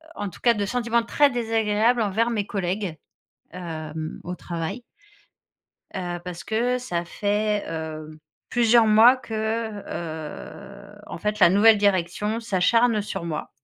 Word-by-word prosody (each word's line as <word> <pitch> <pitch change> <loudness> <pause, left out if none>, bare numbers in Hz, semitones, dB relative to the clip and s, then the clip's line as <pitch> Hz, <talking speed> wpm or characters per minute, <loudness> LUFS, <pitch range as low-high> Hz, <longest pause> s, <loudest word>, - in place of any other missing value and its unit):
en 205 -1 -4
tous - - -14
cas, 235 -2 +3
de 205 -1 -1
sentiments 235 +1 0
très 290 +4 +3
désagréables 225 -1 +1
envers 225 +3 +1
mes 210 -2 -2
collègues, 190 -3 -3 0.6
hem, 160 -3 -6
au 180 +1 -5
travail 170 +7 -5 1.1
heu, 175 -2 -4
parce 180 0 -7
que 245 +3 0
ça 175 -9 -3
fait, 210 +2 -1
heu, 155 -1 -6 0.3
plusieurs 235 -1 +4
mois 225 +4 +7
que, 245 -3 -12 0.5
heu, 175 +5 -8
en - - -7
fait, 210 0 -2
la - - +8
nouvelle 210 +3 +6
direction 200 +2 0
s'acharne 230 +2 +2
sur 195 -3 -5
moi. 155 -3 -4
205 Hz, 135 wpm, -24 LUFS, 175-230 Hz, 1.1 s, la